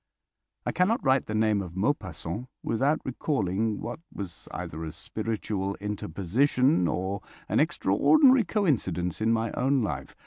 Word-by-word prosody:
I - - 0
cannot 185 +5 +1
write 130 0 +3
the 110 - -3
name 110 -2 +2
of 90 -2 -8
Maupassant 95 - -2 0.2
without 135 +7 +1
recalling 110 - -1
what 120 +6 -5
was 90 -4 -7
either 80 +2 -6
a 80 - -4
spiritual 100 +1 -3
interposition 105 - +1
or 95 +4 -2 0.3
an - - +1
extraordinary 260 - +5
coincidence 110 - 0
in 110 +1 +3
my 115 0 +1
own 135 0 +1
life. 105 - -4
110 Hz, 135 wpm, -27 LUFS, 95-135 Hz, 0.3 s, extraordinary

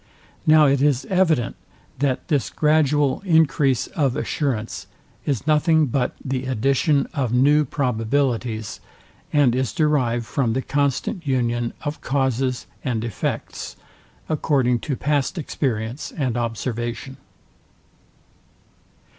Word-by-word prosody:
Now 155 -1 +7
it 135 -1 +3
is 140 -3 +2
evident, 165 -10 +2 0.4
that 135 -2 0
this 145 -4 0
gradual 150 -3 +2
encrease 145 - +3
of 140 -8 -1
assurance 120 -7 -2 0.4
is 140 -5 -1
nothing 155 +1 +3
but 125 -1 -1
the 130 -1 -2
addition 135 +3 +2
of 130 -6 -1
new 145 +5 +4
probabilities, 125 -4 -1 0.5
and 145 -5 +4
is 130 -2 0
derived 130 -7 +1
from 120 -1 0
the 130 +2 -1
constant 145 +4 -1
union 120 -2 0
of 145 +1 -4
causes 130 -2 0 0.2
and 120 -5 -1
effects, 115 -5 -4 0.5
according 135 -6 +1
to 140 - +1
past 145 +4 0
experience 125 -5 -3
and 130 -6 -2
observation. 120 +2 -3
135 Hz, 110 wpm, -22 LUFS, 120-145 Hz, 0.5 s, Now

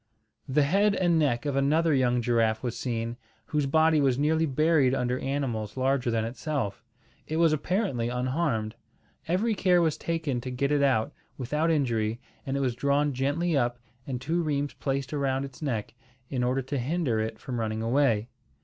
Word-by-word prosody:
The 145 +2 +3
head 200 +7 +3
and 175 -3 +2
neck 135 -4 +1
of 145 -2 -1
another 155 +4 +3
young 125 -3 +2
giraffe 115 -1 +1
was 120 -2 -2
seen, 115 -1 -3 0.3
whose 150 -2 0
body 160 +1 +4
was 130 -3 +2
nearly 160 +3 +2
buried 145 -2 +3
under 125 -1 -1
animals 130 -6 -3
larger 130 -1 +1
than 115 -1 0
itself. 125 -2 -3 0.4
It 155 - -2
was 165 -2 +4
apparently 155 - -1
unharmed. 125 -3 -1 0.5
Every 200 +7 +1
care 185 -3 +3
was 160 -3 +1
taken 160 -7 -2
to 130 - -5
get 140 +3 -1
it 145 -1 +3
out 135 -1 +2 0.2
without 150 +6 0
injury, 120 -7 0 0.3
and 135 +1 -1
it - - -1
was 130 -3 +1
drawn 140 +3 +1
gently 145 +6 0
up 120 -2 +1 0.3
and 130 -2 -3
two 160 +7 -1
rheims 145 -3 -1
placed 135 0 -3
around 135 -2 0
its 135 0 -12
neck, 120 -8 -3 0.4
in 125 -3 0
order 130 +2 0
to 135 +2 -3
hinder 135 -3 0
it 110 0 -3
from 120 +2 -5
running 110 0 -2
away. 115 -3 +2
135 Hz, 175 wpm, -27 LUFS, 120-155 Hz, 0.5 s, body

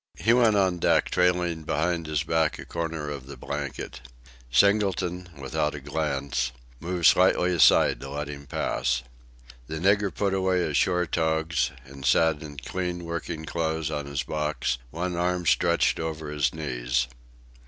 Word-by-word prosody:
He 115 - +3
went 120 -3 +4
on 95 -3 +2
deck - - +2
trailing 90 -2 +1
behind 80 +2 -1
his 75 -2 0
back 80 -1 +1
a - - -8
corner 80 -3 -4
of 70 -3 -7
the 70 -1 -9
blanket. 70 +1 -5 0.5
Singleton, 90 - +2
without 70 +2 -2
a - - -5
glance, 70 -3 -2 0.3
moved 85 0 -2
slightly 90 +2 +5
aside 80 -6 +5
to 70 - -7
let 75 +1 -4
him 70 -1 -8
pass. 60 -3 -1 0.6
The 80 - -5
nigger 100 +3 +2
put 100 -2 -1
away 95 -1 +1
his 75 -4 -1
shore 90 +4 +2
togs 80 -1 0 0.2
and 70 0 -11
sat 80 +3 +3
in 75 -2 -9
clean 90 +3 -4
working 85 -1 -4
clothes 80 -1 -2
on 75 -2 -3
his 70 -1 -2
box, 75 -3 -2
one 85 +5 -3
arm 90 0 0
stretched - - +3
over 80 -2 -4
his 75 -2 +1
knees. 60 -5 -1
80 Hz, 155 wpm, -26 LUFS, 70-90 Hz, 0.6 s, slightly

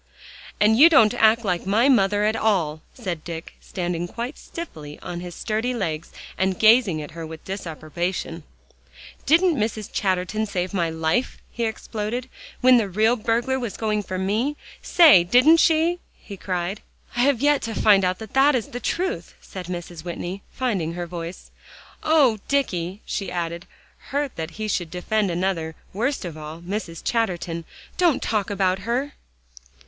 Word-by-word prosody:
"And 220 +2 +4
you 325 +4 +10
don't 225 -10 +6
act 225 +1 +4
like 180 -1 -1
my 220 +6 +3
mother 205 -5 +3
at 215 +1 +2
all," 165 -10 +1
said 180 -10 -5
Dick, 165 -1 -7
standing 175 -1 -3
quite 235 - -5
stiffly 155 - -8
on 175 - -5
his 175 -1 -8
sturdy 225 +3 -2
legs, 165 -7 -3 0.3
and 190 -1 +1
gazing 215 -8 +4
at 150 - -9
her 165 0 -7
with 160 0 -9
disapprobation. 170 -1 -4 0.9
"Didn't 340 +2 +4
Mrs. 215 -1 -2
Chatterton 190 +3 0
save 185 -2 -3
my 170 -4 +1
life," 160 +10 -1
he 235 - -2
exploded, 225 +2 -4 0.3
"when 255 0 +7
the 215 -4 0
real 220 +5 +3
burglar 240 +3 0
was 235 -6 -5
going 215 -1 0
for 185 -2 -5
me? 220 +10 0 0.2
Say, 315 - +7
didn't 255 - +6
she?" 330 +1 +3 0.2
he 200 - -10
cried. 185 +1 -3 0.3
"I - - -3
have 265 -1 +3
yet 290 +1 +3
to 225 -1 -4
find 200 -3 +5
out 180 0 +1
that 270 +6 +2
is 235 - -2
the 245 - -5
truth," 370 +9 -2
said 185 -3 -9
Mrs. 175 -2 -6
Whitney, 175 +2 -5
finding 195 -11 -2
her 175 0 -4
voice. 170 +1 -7 0.5
"Oh, 285 -9 +4
Dicky," 195 -9 -1
she 195 - -3
added, 170 0 -4 0.4
hurt 285 -1 -2
that 160 0 -4
he 215 0 -3
should 175 -5 -1
defend 200 +4 -1
another, 170 -2 -1 0.2
worst 240 +4 -1
of 170 -3 -6
all, 155 +2 -8
Mrs. 175 -2 -5
Chatterton, 175 -7 -1 0.3
"don't 345 -7 +3
talk 210 -3 0
about 190 -2 +1
her." 245 +8 -2
205 Hz, 160 wpm, -23 LUFS, 175-240 Hz, 0.9 s, you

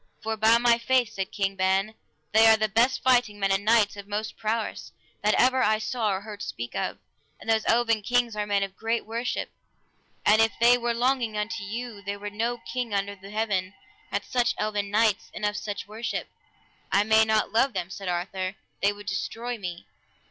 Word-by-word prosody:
For 220 0 -1
by 220 +2 +5
my 235 0 +3
faith, 245 -2 +1
said 195 -1 -4
King 195 -1 -1
Ban, 190 +2 +1 0.4
they 220 +2 +6
are 220 0 +7
the 215 0 +1
best 235 +5 +2
fighting 245 -5 +3
men, 195 -1 +1
and 195 +1 +1
knights 215 -1 +3
of 200 -1 -9
most 210 +1 -3
prowess, 220 0 -3 0.3
that 210 +1 +3
ever 255 +1 +4
I 215 -1 +3
saw 220 0 -1
or 190 0 -2
heard 205 -1 -9
speak 120 -8 -5
of, 95 - -2 0.4
and - - -13
those 220 -1 +2
eleven 230 -1 +2
kings 240 +1 +1
are 210 0 -2
men 200 -1 +2
of 195 -1 -5
great 225 +2 -1
worship; 230 +3 -3 0.7
and 215 +1 +6
if 225 0 +3
they 240 +1 +6
were 240 -1 -1
longing 240 -3 +1
unto 225 +1 -3
you 225 +1 -6
there 200 +1 -4
were 205 0 -6
no 230 +3 -1
king 240 -2 -4
under 200 0 -1
the 195 0 -13
heaven 205 -3 -1 0.3
had - - -2
such 245 -1 +1
eleven 210 -1 -1
knights, 215 0 +2
and 210 - -3
of 210 0 0
such 205 -1 -4
worship. 220 +3 -4 0.6
I 200 - +4
may 220 +1 +5
not 220 -1 +1
love 240 +4 +2
them, 185 -1 -3
said 195 -1 -7
Arthur, 185 +2 -3 0.3
they 200 - +4
would 205 0 -11
destroy 230 +5 -3
me. 175 -3 -6
215 Hz, 200 wpm, -26 LUFS, 200-230 Hz, 0.7 s, are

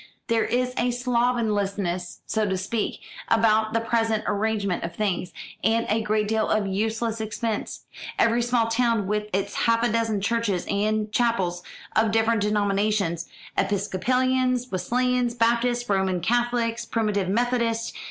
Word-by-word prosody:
"There 230 -1 +2
is 250 +1 0
a 245 - +2
slovenliness, 215 -7 -1
so 215 -2 0
to 190 - 0
speak, 210 +4 -2 0.3
about 220 -1 +3
the 230 - +2
present 225 -1 0
arrangement 205 -2 -1
of 170 0 -5
things, 195 -4 -1 0.3
and 230 +1 +2
a 220 +2 +2
great 215 0 0
deal 220 0 0
of 215 -1 +2
useless 220 +3 -1
expense; 220 0 -3 0.4
every 230 +1 +3
small 240 -1 +2
town 230 -2 +1
with 210 +1 -1
its 195 +1 -1
half 230 0 +2
a 240 - +2
dozen 225 -2 0
churches 205 -3 0
and 210 +1 0
chapels 195 -7 +1 0.3
of 220 0 +3
different 225 0 +2
denominations 205 -4 0 0.3
Episcopalians, 250 +5 +1
Wesleyans, 245 +5 0
Baptists, 240 +1 +1
Roman 190 -2 +1
Catholics, 235 +3 0
Primitive 210 -4 -1
Methodists. 230 +1 0
220 Hz, 135 wpm, -25 LUFS, 205-235 Hz, 0.4 s, about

